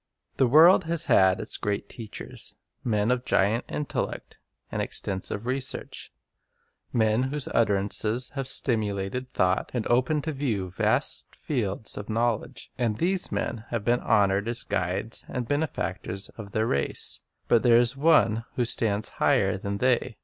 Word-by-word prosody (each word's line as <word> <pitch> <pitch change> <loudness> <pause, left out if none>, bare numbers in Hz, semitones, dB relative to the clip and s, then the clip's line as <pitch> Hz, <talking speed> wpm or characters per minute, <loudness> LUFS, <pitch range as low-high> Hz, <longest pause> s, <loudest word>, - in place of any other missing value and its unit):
"" - - -44
The 130 - +4
world 160 +8 +7
has 170 0 0
had 95 0 +4
its - - -2
great 100 -1 -2
teachers, 110 -2 -8 0.3
men 105 -1 +1
of 125 -1 0
giant 105 +1 +1
intellect 150 -2 -4 0.3
and - - -2
extensive 95 +3 -2
research, 130 +1 -4 0.8
men 110 0 +2
whose 145 0 -3
utterances 110 +2 +1
have 135 -2 -4
stimulated 110 -1 -1
thought, 95 0 +1
and 115 - -1
opened 130 +5 +2
to 160 - -2
view 115 - -2
vast - - 0
fields 110 -7 -3
of 105 - -8
knowledge; 115 0 -2
and 115 -4 0
these 185 - 0
men 115 -1 -3
have 115 -3 -3
been 120 +1 +3
honored 100 -1 +2
as 120 +1 +1
guides 95 +6 -2
and 125 -2 -3
benefactors 105 - -2
of 105 -3 -10
their 110 +2 0
race; 70 -10 -1 0.3
but 115 - +4
there 120 -2 +5
is 120 +1 +3
One 120 -7 +3
who 125 - +1
stands 110 -3 0
higher - - +3
than 100 +1 -4
they. 125 -1 +1
115 Hz, 150 wpm, -26 LUFS, 100-125 Hz, 0.8 s, world